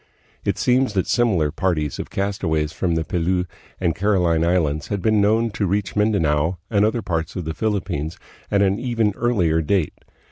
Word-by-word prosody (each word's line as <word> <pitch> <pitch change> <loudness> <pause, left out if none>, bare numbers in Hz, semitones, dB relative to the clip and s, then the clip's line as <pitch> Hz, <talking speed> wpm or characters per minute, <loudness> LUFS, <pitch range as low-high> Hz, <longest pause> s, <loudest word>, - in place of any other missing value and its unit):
It - - -1
seems 125 -2 +2
that 95 -3 +1
similar 95 - +2
parties 75 -6 -1
of - - -5
castaways 80 -6 -1
from 85 -1 -1
the 80 - 0
Pelew 90 +2 0 0.3
and 85 -3 +1
Caroline 90 -4 +2
Islands 80 -4 +1
had 100 - -2
been 110 +2 +2
known 110 +3 +2
to 100 -1 -1
reach 100 0 -1
Mindanao 90 -6 +1
and 100 -2 +3
other 110 +1 +1
parts 85 -4 -2
of 90 - -4
the 80 - -3
Philippines 90 -7 -2 0.3
at 100 0 +3
an 100 +2 +1
even 115 -4 0
earlier 90 -10 +1
date. 85 0 0
95 Hz, 175 wpm, -22 LUFS, 80-105 Hz, 0.3 s, and